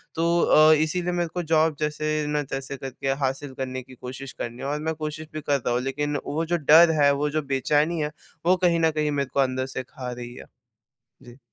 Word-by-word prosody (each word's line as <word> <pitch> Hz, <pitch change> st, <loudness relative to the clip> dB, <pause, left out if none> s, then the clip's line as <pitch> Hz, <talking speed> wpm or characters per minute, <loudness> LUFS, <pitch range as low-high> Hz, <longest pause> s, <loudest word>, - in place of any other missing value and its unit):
तो 170 Hz, +1 st, +2 dB
अ, 155 Hz, +1 st, +6 dB
इसीलिए 160 Hz, +4 st, 0 dB
मेरे 175 Hz, -1 st, -1 dB
को 180 Hz, -, -2 dB
जॉब 160 Hz, -1 st, +2 dB
जैसे 155 Hz, 0 st, -1 dB
ना 150 Hz, 0 st, 0 dB
तैसे 135 Hz, 0 st, -5 dB
करके 135 Hz, +1 st, -4 dB, 0.2 s
हासिल 135 Hz, +1 st, -5 dB
करने 130 Hz, 0 st, -4 dB
की 130 Hz, +1 st, -15 dB
कोशिश 130 Hz, +2 st, -8 dB
करनी 120 Hz, 0 st, -6 dB
है -, -, -5 dB
और 145 Hz, +1 st, -2 dB
मैं -, -, 0 dB
कोशिश 155 Hz, 0 st, -5 dB
भी 155 Hz, -, -4 dB
करता 140 Hz, -4 st, 0 dB
हूँ। 120 Hz, +1 st, +1 dB
लेकिन 145 Hz, +3 st, -2 dB
वो 160 Hz, +3 st, -2 dB
जो 175 Hz, +1 st, 0 dB
डर 160 Hz, +2 st, +7 dB
है, 140 Hz, 0 st, +6 dB
वो 145 Hz, +1 st, 0 dB
जो 155 Hz, +1 st, -1 dB
बेचैनी 150 Hz, +4 st, +1 dB
है, 150 Hz, 0 st, -2 dB, 0.3 s
वो 180 Hz, +2 st, +5 dB
कहीं 170 Hz, -1 st, +3 dB
न 160 Hz, -1 st, +3 dB
कहीं 150 Hz, -1 st, -1 dB
मेरे 140 Hz, -2 st, -1 dB
को -, -, 0 dB
अंदर 130 Hz, -1 st, +1 dB
से 130 Hz, -, -2 dB
खा 125 Hz, 0 st, -7 dB
रही 120 Hz, 0 st, -7 dB
है। -, -, -10 dB, 0.8 s
जी। 120 Hz, -1 st, -14 dB
150 Hz, 225 wpm, -25 LUFS, 135-155 Hz, 0.8 s, डर